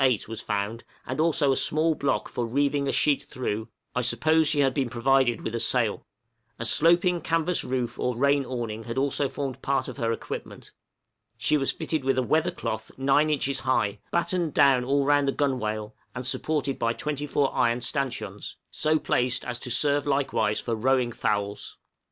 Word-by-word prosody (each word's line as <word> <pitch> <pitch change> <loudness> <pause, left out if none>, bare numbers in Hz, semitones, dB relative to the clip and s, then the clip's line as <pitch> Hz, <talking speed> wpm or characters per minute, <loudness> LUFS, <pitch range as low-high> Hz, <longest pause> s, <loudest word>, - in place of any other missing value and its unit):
8, 125 -6 +2
was 115 0 -6
found, 105 +2 -3 0.2
and 130 +3 -4
also 155 -3 +3
a - - +2
small 160 +4 +1
block 140 -2 -1
for 120 - -3
reeving 140 +4 0
a - - +1
sheet 140 -2 +2
through, 110 -6 -4 0.3
I 125 - 0
suppose 155 +5 +3
she 145 -1 +3
had 135 -2 +2
been 130 -3 -1
provided 125 0 +2
with 110 - -4
a 115 - -1
sail. 115 -3 +1 0.5
A 115 - -4
sloping 175 +6 +3
canvas 165 +2 0
roof 125 -2 -3
or 125 -2 -1
rain 140 +2 +3
awning 115 -4 -5
had 115 +1 -5
also 140 0 +1
formed 135 -2 -5
part 135 -2 0
of - - -7
her 115 -3 0
equipment. 115 - -6 0.7
She - - +2
was 135 -2 +1
fitted 160 -3 -3
with 135 0 +1
a 130 - +2
weather 160 +6 +2
cloth 110 - -4
9 140 +3 +3
inches 140 -2 0
high, 110 -6 0
battened 170 -2 -1
down 135 -3 +5
all 140 +2 +1
round 145 0 +3
the - - +3
gunwale, 110 -7 -1 0.2
and 125 0 -5
supported 140 +1 -1
by 115 0 +1
24 145 0 -1
iron 120 -1 +1
stanchions, 120 -6 -3 0.2
so 155 +1 +1
placed 125 -4 0
as 125 -1 -3
to 125 - -5
serve 145 +4 +1
likewise 135 -7 +1
for 115 - -3
rowing 125 +2 +1
thowels. 105 -2 -2
135 Hz, 180 wpm, -26 LUFS, 120-145 Hz, 0.7 s, down